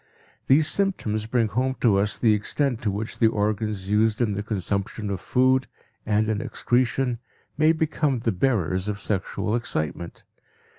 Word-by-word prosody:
These 145 Hz, +3 st, +5 dB
symptoms 110 Hz, -, -1 dB
bring 115 Hz, -1 st, +1 dB
home 130 Hz, +4 st, 0 dB
to 105 Hz, -5 st, +4 dB
us 105 Hz, +1 st, 0 dB
the 110 Hz, -3 st, +4 dB
extent 125 Hz, +4 st, -1 dB
to 110 Hz, -, 0 dB
which 105 Hz, +3 st, -4 dB
the 115 Hz, -, +5 dB
organs 105 Hz, -2 st, -1 dB
used 105 Hz, +1 st, +2 dB
in 115 Hz, -4 st, +1 dB
the 100 Hz, -, -2 dB
consumption 105 Hz, 0 st, -3 dB
of 95 Hz, -1 st, -4 dB
food 130 Hz, +1 st, +2 dB, 0.4 s
and 105 Hz, 0 st, +2 dB
in 110 Hz, -1 st, -1 dB
excretion 125 Hz, 0 st, 0 dB, 0.4 s
may 155 Hz, +2 st, +4 dB
become 155 Hz, -3 st, 0 dB
the 115 Hz, -1 st, 0 dB
bearers 95 Hz, -3 st, 0 dB
of 105 Hz, -1 st, -3 dB
sexual 105 Hz, +2 st, -2 dB
excitement. 85 Hz, -7 st, -4 dB
110 Hz, 155 wpm, -24 LUFS, 105-125 Hz, 0.4 s, These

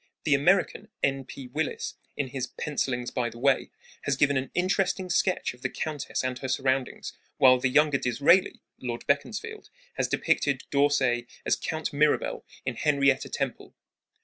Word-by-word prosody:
The 150 Hz, -, +2 dB
American, 185 Hz, +8 st, +2 dB, 0.2 s
N. 135 Hz, -1 st, +1 dB
P. 135 Hz, 0 st, -9 dB
Willis, 155 Hz, +5 st, -2 dB, 0.2 s
in 135 Hz, -2 st, -1 dB
his 130 Hz, -1 st, -3 dB
Pencilings 125 Hz, -4 st, -2 dB
by 120 Hz, -1 st, -1 dB
the 115 Hz, -, -12 dB
Way, 135 Hz, +2 st, +2 dB, 0.4 s
has 140 Hz, -, +1 dB
given 145 Hz, 0 st, +3 dB
an 130 Hz, 0 st, -1 dB
interesting 185 Hz, 0 st, 0 dB
sketch 185 Hz, -4 st, +1 dB
of 125 Hz, -, -18 dB
the -, -, -1 dB
countess 150 Hz, -5 st, -3 dB
and 130 Hz, 0 st, -2 dB
her 130 Hz, -, -4 dB
surroundings, 130 Hz, 0 st, -1 dB, 0.2 s
while 130 Hz, -1 st, +6 dB
the 130 Hz, -, +1 dB
younger 150 Hz, +1 st, +3 dB
Disraeli 145 Hz, +10 st, +3 dB, 0.2 s
(Lord 120 Hz, -2 st, -5 dB
Beaconsfield) 220 Hz, -, -2 dB, 0.3 s
has -, -, +1 dB
depicted 140 Hz, -2 st, +1 dB
D'Orsay 135 Hz, -4 st, +2 dB, 0.2 s
as -, -, +3 dB
Count 160 Hz, -1 st, -3 dB
Mirabel 150 Hz, +1 st, +1 dB, 0.2 s
in -, -, -3 dB
Henrietta 140 Hz, -3 st, +2 dB
Temple. -, -, -4 dB
140 Hz, 155 wpm, -27 LUFS, 130-150 Hz, 0.4 s, while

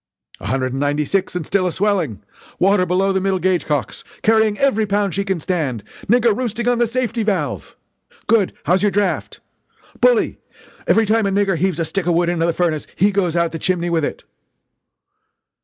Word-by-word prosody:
"A -, -, -7 dB
hundred 130 Hz, +2 st, -1 dB
and 135 Hz, -, -3 dB
ninety 145 Hz, +1 st, 0 dB
six 195 Hz, +2 st, -1 dB
and 175 Hz, -4 st, -3 dB
still 190 Hz, +1 st, +1 dB
a -, -, -1 dB
swelling! 185 Hz, -, -1 dB, 0.3 s
water, 190 Hz, 0 st, +3 dB
below 190 Hz, +2 st, +1 dB
the 190 Hz, -, 0 dB
middle 195 Hz, 0 st, +1 dB
gauge 185 Hz, -1 st, 0 dB
cocks! 135 Hz, -9 st, -2 dB, 0.2 s
carrying 220 Hz, -1 st, +3 dB
every 225 Hz, -6 st, +1 dB
pound 200 Hz, -2 st, 0 dB
she 200 Hz, -, -1 dB
can 190 Hz, -3 st, -2 dB
stand! 145 Hz, -, -2 dB, 0.2 s
nigger 235 Hz, -1 st, +3 dB
roosting 235 Hz, -1 st, -3 dB
on 245 Hz, -1 st, +2 dB
the 240 Hz, -, +3 dB
safety 240 Hz, -1 st, -2 dB
valve!" 210 Hz, -3 st, -2 dB, 0.5 s
"Good! 215 Hz, -5 st, +2 dB
How's 180 Hz, +2 st, +2 dB
your 205 Hz, -, +3 dB
draft?" 205 Hz, 0 st, -1 dB, 0.6 s
"Bully! -, -, +2 dB, 0.5 s
Every 225 Hz, -, +4 dB
time 215 Hz, 0 st, +2 dB
a -, -, +1 dB
nigger 195 Hz, -1 st, +1 dB
heaves 180 Hz, 0 st, 0 dB
a 165 Hz, -, -1 dB
stick 195 Hz, +1 st, -3 dB
of 175 Hz, -, +2 dB
wood 170 Hz, 0 st, +2 dB
into 170 Hz, -1 st, 0 dB
the -, -, +2 dB
furnace 165 Hz, -3 st, -1 dB
he 200 Hz, +3 st, +3 dB
goes 185 Hz, -4 st, 0 dB
out 170 Hz, -1 st, +1 dB
the 165 Hz, -, -5 dB
chimney, 175 Hz, -1 st, -1 dB
with 165 Hz, -2 st, +1 dB
it!" -, -, -4 dB
190 Hz, 195 wpm, -19 LUFS, 170-210 Hz, 0.6 s, Every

